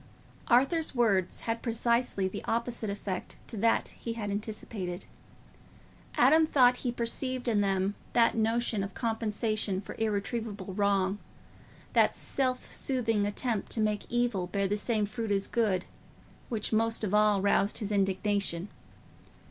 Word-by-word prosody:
Arthur's 275 +6 +3
words 200 -7 +2
had 230 0 -2
precisely 235 -4 +1
the 190 - -6
opposite 235 -1 -2
effect 200 -2 -4
to - - -8
that 230 +3 +2
he 230 - -6
had 210 -3 -4
anticipated. 200 -3 -4 1.1
Adam 320 +1 +6
thought 250 -5 +5
he 250 - -2
perceived 245 +2 -1
in 215 -3 +3
them 195 0 +1 0.2
that 235 -1 +4
notion 225 -1 +1
of 195 0 -6
compensation 220 -3 -1
for 195 - -8
irretrievable 210 -2 -2
wrong, 200 0 +1 0.7
that - - +4
self 255 -2 -1
soothing 225 -6 0
attempt 220 0 -2
to - - -2
make 210 -1 0
evil 240 -7 0
bear 200 +2 0
the 205 - 0
same 215 0 0
fruits 215 +1 -3
as 195 0 0
good, 200 -6 +1 0.6
which 220 -2 -1
most 225 +1 +1
of 205 -2 -1
all 210 -1 +4
roused 200 +1 +2
his 210 -2 -3
indignation. 195 -2 0
215 Hz, 140 wpm, -30 LUFS, 200-235 Hz, 1.1 s, Adam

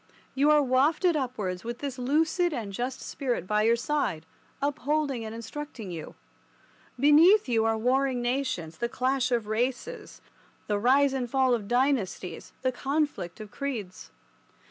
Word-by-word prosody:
You 280 +3 +3
are 300 -1 +5
wafted 295 +7 +3
upwards, 215 -10 -3
with 235 +1 -5
this 275 -2 -5
lucid 320 +6 +1
and 215 -7 -4
just 250 +5 -3
spirit 250 - -3
by 210 +2 +1
your 230 +2 +4
side 235 - -1 0.3
upholding 285 -2 -1
and 220 0 -6
instructing 230 -3 -7
you. 165 -2 -7 0.8
Beneath 315 - +6
you 225 -2 +2
are 225 0 +2
warring 255 +2 +1
nations, 240 -10 -2
the 235 0 -1
clash 255 +1 0
of 235 -3 +1
races, 255 - -3 0.5
the 205 -1 0
rise 270 +4 +4
and 250 -3 -2
fall 260 0 +3
of 215 -4 -2
dynasties, 240 - -1
the 260 - +2
conflict 275 - -2
of 215 -1 -9
creeds. 230 -10 -5
255 Hz, 145 wpm, -27 LUFS, 225-285 Hz, 0.8 s, Beneath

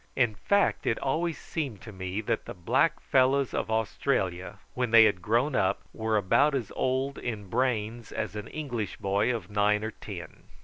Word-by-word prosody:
In 120 -4 +2
fact 200 - +1
it 115 - +2
always 160 +4 -1
seemed 135 - -4
to 110 - -9
me 95 +1 -4
that 105 - -2
the - - -7
black 90 -2 +2
fellows 130 +1 +2
of - - -2
Australia, 95 -5 -1 0.2
when 125 -1 -1
they 115 0 +8
had 100 -5 +2
grown 120 +9 +1
up, 95 -1 +1
were 110 -1 0
about 140 +9 +3
as 120 -7 -3
old 130 +2 0
in 105 -5 -5
brains 115 -2 -1
as - - -4
an 105 - -5
English 120 -9 -4
boy 100 +5 +1
of 115 -3 -5
nine 105 +1 +2
or 110 - -3
ten. - - -9
110 Hz, 180 wpm, -28 LUFS, 105-130 Hz, 0.2 s, they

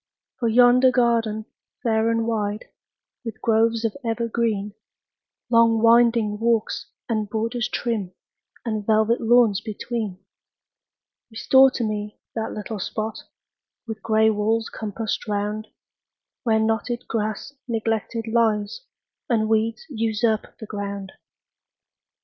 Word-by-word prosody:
For 235 - +1
yonder 245 +2 +6
garden, 230 -3 +1 0.4
fair 225 -1 +2
and 230 0 +1
wide, 215 -2 -2 0.6
With 225 -2 -6
groves 230 0 +2
of 220 - -1
evergreen, 225 -3 -1 0.8
Long 230 -1 +5
winding 230 -2 +4
walks, 230 -1 0 0.2
and 215 -3 -1
borders 230 +2 -1
trim, 220 -8 -2 0.5
And 215 -3 -2
velvet 220 +2 +2
lawns 230 -3 +4
between; 215 -2 -4 1.1
Restore 265 +4 +5
to 240 - -1
me 210 -1 -3 0.2
that 225 -1 -3
little 210 0 -5
spot, 215 +3 -3 0.7
With 220 -2 -6
gray 220 0 +3
walls 220 +2 0
compassed 220 +2 -4
round, 210 +1 -2 0.7
Where 225 -3 +2
knotted 225 +2 -1
grass 220 +5 -3
neglected 225 0 -2
lies, 220 - +1 0.5
And 220 -3 +2
weeds 220 +3 0
usurp 225 -4 -1
the 220 - -8
ground. 200 -2 -5
225 Hz, 110 wpm, -23 LUFS, 215-230 Hz, 1.1 s, yonder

